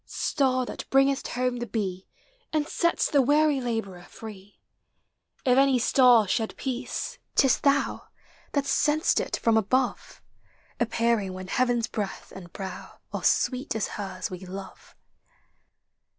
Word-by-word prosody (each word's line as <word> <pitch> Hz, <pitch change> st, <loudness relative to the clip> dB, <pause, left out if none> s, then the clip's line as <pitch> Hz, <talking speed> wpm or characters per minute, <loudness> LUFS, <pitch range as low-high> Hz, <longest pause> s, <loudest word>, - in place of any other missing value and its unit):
Star 255 Hz, -3 st, 0 dB
that -, -, -8 dB
bringest 270 Hz, 0 st, +3 dB
home 250 Hz, 0 st, -1 dB
the 240 Hz, 0 st, -4 dB
bee, 195 Hz, -4 st, -3 dB, 0.4 s
And 305 Hz, -1 st, +1 dB
sett'st 340 Hz, +2 st, 0 dB
the 285 Hz, -, +5 dB
weary 290 Hz, +1 st, +3 dB
laborer 225 Hz, -7 st, -3 dB
free! 205 Hz, -2 st, -11 dB, 0.9 s
If 255 Hz, 0 st, +5 dB
any 275 Hz, -1 st, +4 dB
star 245 Hz, -2 st, +5 dB
shed 220 Hz, +3 st, -1 dB
peace, 260 Hz, -, -4 dB, 0.2 s
't -, -, +5 dB
is 265 Hz, -, +3 dB
thou, 280 Hz, -1 st, +1 dB, 0.5 s
That 285 Hz, -1 st, +1 dB
send'st 295 Hz, +3 st, +2 dB
it -, -, -2 dB
from 225 Hz, -1 st, +2 dB
above, 250 Hz, +4 st, 0 dB, 0.6 s
Appearing 230 Hz, -4 st, +1 dB
when 185 Hz, 0 st, -8 dB
heaven's 245 Hz, -1 st, +1 dB
breath 210 Hz, -4 st, -5 dB
and 175 Hz, -3 st, -10 dB
brow 190 Hz, -1 st, -8 dB, 0.2 s
Are -, -, -4 dB
sweet 255 Hz, -1 st, +1 dB
as 220 Hz, -, -1 dB
hers 190 Hz, -3 st, -5 dB
we 180 Hz, -, -6 dB
love. 190 Hz, +1 st, -10 dB
240 Hz, 135 wpm, -26 LUFS, 205-270 Hz, 0.9 s, the